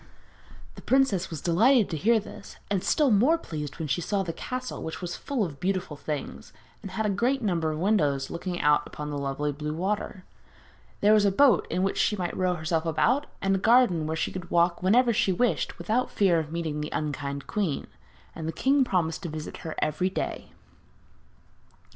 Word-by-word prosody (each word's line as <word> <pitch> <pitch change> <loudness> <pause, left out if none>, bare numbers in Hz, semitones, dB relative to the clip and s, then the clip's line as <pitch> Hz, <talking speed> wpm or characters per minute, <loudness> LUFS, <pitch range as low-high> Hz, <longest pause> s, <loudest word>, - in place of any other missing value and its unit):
The - - -12
princess 260 -9 +2
was 160 -4 -6
delighted 220 +7 +4
to - - -1
hear 220 +8 +3
this, 210 - -11
and 195 -3 0
still 295 -5 +3
more 250 +11 +4
pleased 150 - -6
when 160 -2 -4
she 145 +5 0
saw 195 +3 -1
the 165 -3 -4
castle, 255 +6 -5
which 160 0 -5
was 175 -2 -5
full 275 -6 -2
of 145 -5 -8
beautiful 185 -3 -2
things, 150 0 -6 0.3
and 195 - -7
had 215 +4 -2
a - - +1
great 245 +6 0
number 170 -6 0
of 155 - -4
windows 150 -8 +1
looking 175 +1 -4
out 150 0 +1
on 150 0 -4
the 145 - -3
lovely 140 +1 -2
blue 150 +2 -4
water. 190 +1 -3 0.8
There 210 +1 +5
was 215 -1 +5
a 200 - +3
boat 270 +6 +4
in 185 - 0
which 195 - 0
she 210 - +2
might 180 -3 -3
row 185 -1 +1
herself 160 0 -1
about, 255 - +1 0.2
and 195 0 +2
a 195 - +1
garden 210 -8 +4
where 160 +1 -2
she - - -1
could 180 -2 -7
walk 170 0 +2
whenever 235 +6 +4
she 200 - +2
wished 240 +7 0
without 245 +3 0
fear 185 -5 +3
of 155 -1 -5
meeting 160 -3 -3
the 150 - -4
unkind 140 -2 -3
queen; 190 -9 -2 0.5
and 160 -1 -6
the - - -1
king 270 +8 +2
promised 175 -9 -1
to 170 - -5
visit 155 0 -6
her 160 - -6
every 155 +5 0
day. 190 - -4
180 Hz, 200 wpm, -27 LUFS, 155-210 Hz, 0.8 s, There